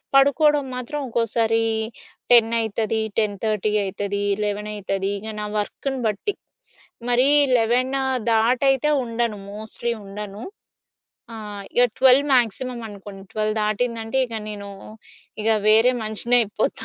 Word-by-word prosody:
పడుకోవడం 285 +1 +4
మాత్రం 250 +4 -4
ఒక్కోసారి 225 -1 +1 0.7
10 230 -2 +6
అయితది, 220 0 -1 0.2
10:30 215 0 -1
అయితది. 200 +1 -3 0.2
11 210 0 -3
అయితది. 195 -1 -2
ఇగ 220 +2 -7
నా - - -3
వర్క్‌ని 265 +6 -3
బట్టి. 215 - -2 0.8
మరి 245 +2 +4 0.3
11 245 +3 +1 0.4
దాటైతే 240 +4 +2
అయితే 270 +3 +1
ఉండను, 230 -2 -2 0.2
మోస్ట్లీ 220 +2 -3
ఉండను. 205 +2 -7 0.9
ఆహ్, 210 -2 -7
ఇగ 245 - +5 0.2
12 265 +2 +6
మాక్సిమమ్ 240 0 -1
అనుకోండి. 195 -1 -11
12 215 0 -1
దాటిందంటే 225 +3 -1
ఇగ 230 - -8 0.2
నేను 200 -1 -7 0.7
ఇగ 220 - 0 0.2
వేరే 225 +4 +6
మనిషినయిపోతా 220 0 0
225 Hz, 115 wpm, -22 LUFS, 210-245 Hz, 0.9 s, 10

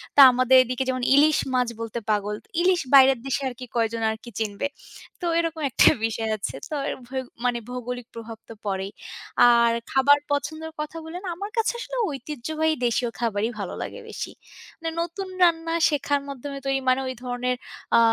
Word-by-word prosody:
তা 285 - +9
আমাদের 255 +1 +5
এদিকে 255 +1 -2
যেমন 255 -1 -1
ইলিশ 300 +2 +5 0.2
মাছ 250 -1 +2
বলতে 230 +1 -4
পাগল। 210 0 0 0.3
ইলিশ 360 0 +3
বাইরের 270 -2 +7
দেশে 270 +1 -1
আরকি 250 0 -9
কয়জন 230 -1 0
আরকি 220 +2 -8
চিনবে। 215 +4 -1 0.5
তো - - -3
এরকম 330 -1 -2
একটা - - +5 0.2
বিষয় 225 0 -2
আছে। 200 - -4
তো - - -6 0.2
এর - - -3
ভৌ 260 +1 -3 0.3
মানে 245 -1 +1
ভৌগোলিক 250 -1 -5
প্রভাবতো 225 0 -9
পড়েই। 195 -1 -2 0.6
আর 235 -1 +5 0.2
খাবার 280 +2 +5
পছন্দের 315 +2 -2
কথা 305 +2 -4
বলেন, 340 +3 -7
আমার 400 +4 -5
কাছে 450 +1 +2
আসলে - - -5
ঐতিহ্যবাহী 310 +2 -2
দেশীয় 240 0 +1
খাবারই 225 -2 0
ভালো 200 - -4
লাগে - - -6
বেশি। - - -5 0.5
মানে 330 -1 -3
নতুন 345 +3 -4 0.2
রান্না 330 -1 +3 0.2
শেখার 285 -1 0
মাধ্যমে 280 0 -6
তো - - -5
ওই 270 - +1
মানে 255 +1 +3
ওই 260 - -3
ধরনের 250 0 -1 0.4
আ - - +7
255 Hz, 170 wpm, -25 LUFS, 235-305 Hz, 0.6 s, তা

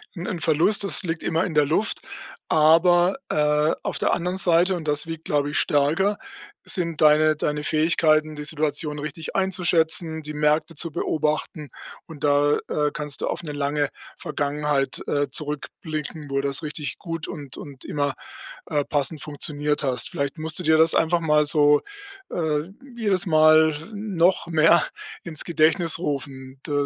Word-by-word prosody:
'n 175 0 -6
'n 175 - -4
Verlust, 165 +7 +3
das 195 - +1
liegt 165 -2 -4
immer 165 +2 0
in 165 - -5
der 150 - +4
Luft, 185 +8 +1 0.5
aber, 175 - +4
äh, 150 +1 +2
auf - - -3
der - - +1
anderen 180 +2 -2
Seite- 175 +1 +3
und 160 -3 -6
das 150 +1 +1
wiegt, 165 -1 -7
glaube 145 -1 0
ich, - - +1
stärker- 165 +7 +1 0.5
sind 170 -4 +2
deine 155 0 +5
deine 150 0 -2
Fähigkeiten, 155 0 +2
die 150 - -6
Situation 150 -1 -1
richtig 150 +2 -7
einzuschätzen, 170 -4 +1
die 150 0 -7
Märkte 150 +2 +1
zu 165 +2 0
beobachten, 150 -1 -2 0.4
und 155 -4 -11
da, 145 0 +3
äh, 150 0 0
kannst 150 -3 -4
du - - -1
auf 175 - -4
'ne 150 - -6
lange 145 0 -1 0.3
Vergangenheit, 145 -1 -2
äh, 145 0 0
zurückblicken, 150 0 -5
wo 140 - 0
das 140 +2 -1
richtig 150 -1 -5
gut 165 -3 -5
und 140 -5 -8
und 140 -3 -11
immer, 145 -1 -1 0.5
äh, 145 -1 -1
passend 145 +1 -1
funktioniert 150 0 -2
hast. 125 -3 +1
Vielleicht 140 +3 -3
musst 160 0 -3
du - - -5
dir 160 -1 +4
das 160 0 +4
einfach 170 +2 +2
mal 150 -2 +3
so, 145 -1 +4 0.5
äh, 155 -1 -1 0.3
jedes 200 -5 +1
Mal 155 -1 +5 0.2
noch 190 -5 +1
mehr 165 +1 +4 0.4
ins 160 -3 -2
Gedächtnis 165 +1 +2
rufen. 135 -4 -5
Da - - -7
155 Hz, 160 wpm, -23 LUFS, 150-165 Hz, 0.5 s, deine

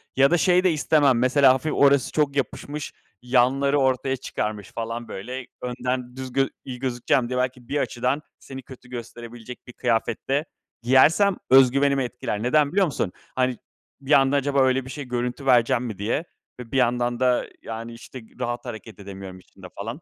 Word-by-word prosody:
ya 135 +2 +4
da 175 - +4
şey 180 +1 +3
de 185 - +4
istemem 145 -4 +3
mesela 130 +1 +5
hafif 135 +4 -2
orası 140 -2 +4
çok 150 -2 0
yapışmış, 145 +1 -4 0.3
yanları 135 +3 +2
ortaya 130 0 +1
çıkarmış 105 -5 -4
falan 115 +1 -5
böyle, 125 +6 -7
önden 125 0 -3
düz 130 -1 -6
gö 135 0 +2 0.2
iyi 125 -2 -7
gözükeceğim 125 -1 0
diye 125 0 -1
belki 125 -1 -3
bir 145 - -2
açıdan 130 +1 -1 0.2
seni 135 -1 -9
kötü 125 -1 -14
gösterebilecek 120 0 -9
bir 125 - -10
kıyafet 115 -1 -1
de 140 +3 +1 0.4
giyersem 155 - +4
özgüvenimi 135 +1 +5
etkiler. 120 -3 -4
Neden, 145 +3 +3
biliyor 195 +2 +3
musun? 130 - -2 0.2
Hani 130 -1 +1 0.4
bir 135 +2 -6
anda 135 -1 +5
acaba 140 0 +2
öyle 130 0 +2
bir - - -9
şey 145 -1 -6
görüntü 125 +2 -3
verecek 120 -3 +4
miyim 115 -5 -5
diye 110 +9 -1 0.4
ve 120 -2 -9
bir 135 - 0
yandan 120 -1 +1
da, 125 -1 +2
yani, 115 +1 -7
işte, 125 +2 -10 0.2
rahat 120 +1 -3
hareket 110 -4 -9
edemiyorum 95 -2 -9
içinde 90 0 -14
falan. 115 +9 -6
125 Hz, 175 wpm, -24 LUFS, 120-140 Hz, 0.4 s, mesela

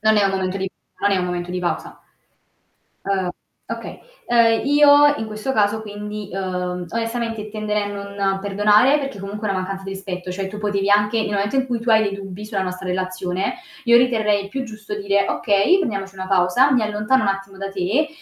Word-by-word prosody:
Non 220 0 +4
è 205 - +4
un 195 - +3
momento 190 0 -2
di 190 0 -3 0.3
non 205 - +2
è 200 - +3
un 180 - 0
momento 175 0 -3
di 180 - -2
pausa. 180 -1 -3 1.0
Uhm, 190 -2 -1 0.4
okay. - - -6 0.3
Ehm, 230 -1 +4
io 290 0 +6
in 220 - -4
questo 215 +5 -3
caso 215 -2 +2
quindi, 210 -1 -6
uhm, 180 -1 -3
onestamente 230 -1 -3
tenderei 210 -1 -1
a - - -3
non 200 -1 -2
perdonare 210 +7 +4
perché 275 -7 -5
comunque 205 +2 -5
è - - 0
una 190 -1 0
mancanza 195 +1 -5
di 195 - -6
rispetto, 185 -2 -6
cioè 190 +1 -3
tu 210 +2 -7
potevi 200 -1 0
anche 210 +2 +3
nel 210 - -3
momento 205 +4 0
in 265 0 +2
cui 240 -3 -2
tu 235 - -6
hai 220 0 +6
dei 200 -2 -1
dubbi 195 0 -8
sulla 210 -2 -3
nostra 185 0 -5
relazione, 185 - -2 0.3
io 235 -1 +6
riterrei 215 -5 +2
più 265 +6 -4
giusto 215 -3 -7
dire: 200 0 +2
"Okay, 205 - +3
prendiamoci 195 - -3
una 190 0 -6
pausa, 195 +8 +4
mi 250 -3 +3
allontano 210 +5 +1
un 205 - +1
attimo 195 0 -3
da 195 0 -5
te", 200 - 0
205 Hz, 205 wpm, -21 LUFS, 195-220 Hz, 1.0 s, io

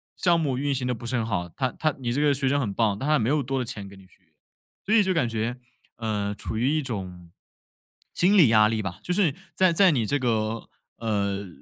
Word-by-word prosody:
项 170 -2 +2
目 135 -5 -1
运 140 0 0
行 125 -1 -2
得 125 - 0
不 120 +1 -7
是 130 - 0
很 115 - 0
好， 90 -6 -2
他 130 +6 -2
他 155 -2 -1
你 120 -3 -3
这 145 - 0
个 145 -1 +4
学 135 0 0
生 140 +2 +2
很 105 -5 -2
棒， 105 -1 0
但 145 - -2
他 155 - +4
没 115 +2 0
有 150 0 +2
多 135 +1 -3
的 125 - -1
钱 105 -3 -6
给 100 - -13
你 95 - -16
续 95 - -28
约。 80 - -38 0.6
所 210 - 0
以 225 - +6
就 190 -1 +1
感 160 -9 +1
觉， 115 +2 -2 0.4
呃， 105 -3 -2
处 110 - -6
于 120 +4 +1
一 155 0 0
种 90 -8 -6 0.8
心 195 +4 +3
理 150 -10 +7
压 105 -1 +5
力 110 0 -1
吧， 95 0 -5
就 180 - -5
是 180 -7 +2 0.2
在 185 -2 +3
在 190 +2 +5
你 120 -8 +1
这 145 +6 0
个 110 -3 -1 0.3
呃， 100 -3 -2
120 Hz, 270 characters per minute, -25 LUFS, 105-145 Hz, 0.8 s, 理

